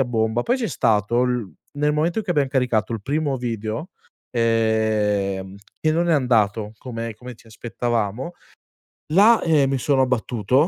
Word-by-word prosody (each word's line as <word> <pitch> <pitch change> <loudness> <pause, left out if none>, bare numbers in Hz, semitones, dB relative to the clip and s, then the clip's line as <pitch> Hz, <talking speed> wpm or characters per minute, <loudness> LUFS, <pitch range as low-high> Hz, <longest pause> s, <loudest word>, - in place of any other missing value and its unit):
a - - +3
bomba. 110 -1 0
Poi 245 - +1
c'è 240 -4 -2
stato 110 +1 +1
il 125 -7 -1 0.2
nel 150 +1 +1
momento 160 +6 0
in 220 - -2
cui 185 - 0
abbiam 145 -4 +2
caricato 125 -5 0
il 110 -3 -4
primo 145 +2 -1
video, 115 - -4 0.4
ehm, 110 -4 0 0.2
e 155 - +2
non 170 +2 +1
è - - +4
andato 110 -6 +1
come 115 -2 -6
come 125 +3 -10
ci 115 - -22
aspettavamo, 115 - -3 0.8
là, 215 +6 +6
ehm, 150 -5 +3
mi 135 - 0
sono 135 +1 +2
abbattuto, 125 - +1
120 Hz, 165 wpm, -22 LUFS, 110-145 Hz, 0.8 s, là